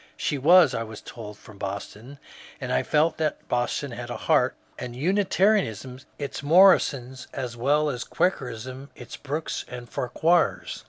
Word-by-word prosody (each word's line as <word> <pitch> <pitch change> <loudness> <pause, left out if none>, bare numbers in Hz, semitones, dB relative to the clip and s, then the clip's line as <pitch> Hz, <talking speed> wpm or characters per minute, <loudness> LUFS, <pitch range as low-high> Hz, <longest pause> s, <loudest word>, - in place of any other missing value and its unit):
She 145 - -1
was, 165 -1 +6
I 115 - -2
was 110 -1 -7
told, 105 -3 -10
from 110 -2 -15
Boston, 105 +6 -6 0.4
and - - -3
I 65 - +3
felt 155 +2 +1
that 155 -1 -2
Boston 125 +3 -1
had 120 0 -7
a - - -4
heart, - - +2 0.2
and 120 -1 -6
Unitarianism 180 - +1 0.2
its 140 -2 -5
Morrisons 140 -6 +4
as 125 -3 -4
well 145 +6 +2
as 125 -4 -3
Quakerism 130 - -2
its - - -9
Brookes 150 +3 -4
and 125 -1 -8
Farquhars. 160 +10 0
130 Hz, 150 wpm, -25 LUFS, 120-155 Hz, 0.4 s, was